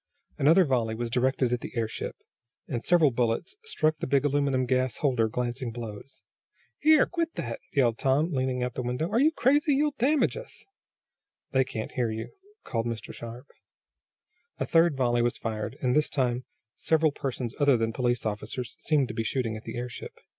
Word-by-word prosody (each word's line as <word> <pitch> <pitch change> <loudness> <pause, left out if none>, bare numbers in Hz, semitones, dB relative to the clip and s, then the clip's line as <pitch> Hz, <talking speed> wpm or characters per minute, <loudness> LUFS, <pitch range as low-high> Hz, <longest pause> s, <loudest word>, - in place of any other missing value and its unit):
Another 165 +6 +6
volley 120 -5 0
was 120 0 -3
directed 130 0 +1
at 125 - -1
the - - -8
airship, 110 -1 -3 0.5
and 120 - -3
several 165 -5 +4
bullets 120 - -1
struck 155 - +1
the - - -4
big 140 +1 +2
aluminum 140 -2 +1
gas 130 -1 0
holder 125 -6 +2
glancing 120 +2 -3
blows. 115 +2 -8 0.6
"Here! 310 0 +6
Quit 335 -2 -2
that!" 115 -1 -4
yelled 120 -5 +2
Tom, 145 +6 +2
leaning 130 -1 0
out 125 - -1
of - - -31
the - - -3
window. 125 +7 -2
"Are 230 - +3
you 300 +4 +5
crazy? 290 +1 +3
You'll 295 +1 +2
damage 280 +5 +3
us!" - - -9 0.9
"They 130 0 +4
can't 110 -4 -5
hear 120 -3 0
you," 110 0 -5 0.3
called 115 0 -2
Mr. 115 -2 -5
Sharp. 120 +3 -8 1.1
A - - -1
third 165 -3 +3
volley 120 -2 +2
was 120 0 0
fired, 110 -1 -4
and 125 -1 +2
this 150 0 +3
time 125 -2 0 0.3
several 160 -1 +2
persons 130 -4 -4
other 140 -3 +5
than 115 0 -1
police 120 0 0
officers 110 +3 -4
seemed 150 -5 +2
to - - -4
be 115 - -1
shooting 115 -2 -1
at 110 - -9
the - - -5
airship. 125 0 -6
130 Hz, 180 wpm, -27 LUFS, 120-150 Hz, 1.1 s, Another